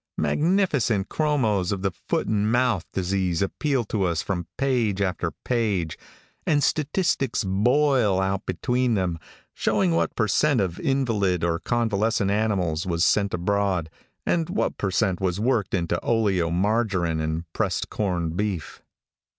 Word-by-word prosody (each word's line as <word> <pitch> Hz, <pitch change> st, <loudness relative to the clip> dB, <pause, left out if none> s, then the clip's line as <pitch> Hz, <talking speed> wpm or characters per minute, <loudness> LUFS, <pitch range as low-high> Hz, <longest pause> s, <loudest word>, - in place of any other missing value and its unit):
Magnificent 145 Hz, -, +1 dB
chromos 115 Hz, -, +1 dB
of 100 Hz, -1 st, -3 dB
the 95 Hz, -, +1 dB
foot -, -, -2 dB
and 105 Hz, 0 st, +1 dB
mouth 120 Hz, -8 st, +2 dB
disease 95 Hz, -2 st, 0 dB
appeal 135 Hz, +6 st, 0 dB
to 100 Hz, -2 st, -1 dB
us 85 Hz, -3 st, 0 dB
from 90 Hz, -4 st, -3 dB
page 120 Hz, -7 st, +1 dB
after 90 Hz, -3 st, -1 dB, 0.2 s
page, 105 Hz, -10 st, 0 dB, 0.5 s
and 145 Hz, -2 st, +2 dB
statistics 155 Hz, -5 st, 0 dB
boil 115 Hz, +1 st, +2 dB
out 95 Hz, 0 st, -1 dB
between 125 Hz, -1 st, 0 dB
them, 90 Hz, -4 st, -1 dB, 0.3 s
showing 100 Hz, -5 st, +1 dB
what 85 Hz, 0 st, 0 dB
per 110 Hz, -, +1 dB
cent 145 Hz, +5 st, +2 dB
of 90 Hz, -4 st, -1 dB
invalid 105 Hz, -10 st, 0 dB
or 85 Hz, -1 st, +1 dB
convalescent 110 Hz, -2 st, 0 dB
animals 95 Hz, -6 st, 0 dB
was 85 Hz, -1 st, +1 dB
sent 100 Hz, -2 st, +2 dB
abroad, 90 Hz, -2 st, 0 dB, 0.3 s
and 165 Hz, -1 st, 0 dB
what 195 Hz, -, -1 dB
per 100 Hz, -, 0 dB
cent 95 Hz, -1 st, 0 dB
was 95 Hz, 0 st, 0 dB
worked 110 Hz, -4 st, +1 dB
into 85 Hz, -1 st, -1 dB
oleomargarine 95 Hz, -3 st, +1 dB
and 80 Hz, +1 st, -2 dB
pressed -, -, -1 dB
corn 90 Hz, -6 st, -1 dB
beef. 95 Hz, -4 st, -3 dB
100 Hz, 140 wpm, -24 LUFS, 90-120 Hz, 0.5 s, mouth